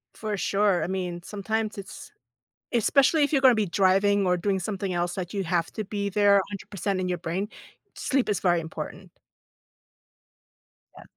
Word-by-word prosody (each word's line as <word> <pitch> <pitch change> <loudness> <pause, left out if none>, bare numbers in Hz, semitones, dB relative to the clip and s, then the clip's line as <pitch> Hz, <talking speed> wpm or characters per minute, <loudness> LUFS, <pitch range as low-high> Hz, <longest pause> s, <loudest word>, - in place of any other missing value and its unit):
For 215 -2 -3
sure. 195 -3 +2
I - - -2
mean, 180 -2 -3
sometimes 215 +1 -3
it's 200 - -9 0.6
especially 275 +6 +3
if 285 - -2
you're 280 - +3
gonna 255 -2 +7
be 215 -2 +1
driving 195 +2 +3
or 180 0 +3
doing 195 +2 0
something 190 0 -3
else 175 0 -1
that 180 -2 -5
you 200 -2 -2
have 170 -1 0
to 215 - -4
be 200 0 -3
there 200 0 +4
100% 200 -1 -3
in 185 - -2
your 180 -1 -1
brain, 185 +5 -3 0.5
sleep 265 -4 0
is 205 - 0
very 175 -2 +2
important. 160 0 -7 1.9
Yeah. - - -12
200 Hz, 165 wpm, -26 LUFS, 180-210 Hz, 1.9 s, gonna